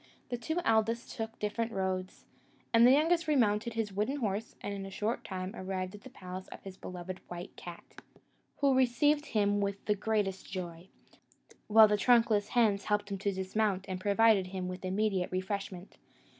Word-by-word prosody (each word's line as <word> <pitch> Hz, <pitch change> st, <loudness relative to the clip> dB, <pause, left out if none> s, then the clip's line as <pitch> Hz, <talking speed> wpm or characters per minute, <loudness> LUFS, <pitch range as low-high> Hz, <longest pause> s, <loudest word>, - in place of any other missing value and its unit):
The 245 Hz, -, -2 dB
two 315 Hz, +8 st, -2 dB
eldest 225 Hz, +1 st, +1 dB
took 225 Hz, -2 st, -5 dB
different 225 Hz, +2 st, -2 dB
roads, 190 Hz, -1 st, -3 dB, 0.5 s
and 230 Hz, +1 st, +7 dB
the -, -, +7 dB
youngest 325 Hz, +4 st, +3 dB
remounted 235 Hz, -6 st, +2 dB
his 220 Hz, -3 st, -2 dB
wooden 210 Hz, +8 st, 0 dB
horse, 220 Hz, -5 st, -3 dB
and 205 Hz, -, -4 dB
in 200 Hz, -1 st, -5 dB
a 195 Hz, -, -6 dB
short 210 Hz, +4 st, -2 dB
time 185 Hz, +2 st, -5 dB
arrived 185 Hz, -1 st, -4 dB
at 205 Hz, -, -11 dB
the 260 Hz, -, -11 dB
palace 185 Hz, -5 st, -8 dB
of -, -, -11 dB
his 195 Hz, -1 st, -8 dB
beloved 185 Hz, 0 st, -7 dB
white 175 Hz, 0 st, -8 dB
cat, 175 Hz, -1 st, -9 dB, 0.8 s
who 280 Hz, -1 st, +4 dB
received 275 Hz, +4 st, +3 dB
him 205 Hz, -2 st, +1 dB
with 200 Hz, 0 st, -3 dB
the 210 Hz, -, +3 dB
greatest 205 Hz, -2 st, -2 dB
joy, 175 Hz, -2 st, -6 dB, 0.8 s
while 220 Hz, 0 st, +8 dB
the 210 Hz, 0 st, +2 dB
trunkless 225 Hz, -2 st, +4 dB
hands 210 Hz, -5 st, +2 dB
helped 205 Hz, -1 st, 0 dB
him 195 Hz, -, -3 dB
to 200 Hz, +1 st, 0 dB
dismount, 190 Hz, +1 st, -1 dB
and 185 Hz, -1 st, -4 dB
provided 205 Hz, -1 st, +4 dB
him 185 Hz, -1 st, -4 dB
with 180 Hz, +1 st, -6 dB
immediate 190 Hz, -1 st, 0 dB
refreshment. 185 Hz, 0 st, -4 dB
205 Hz, 175 wpm, -31 LUFS, 190-225 Hz, 0.8 s, while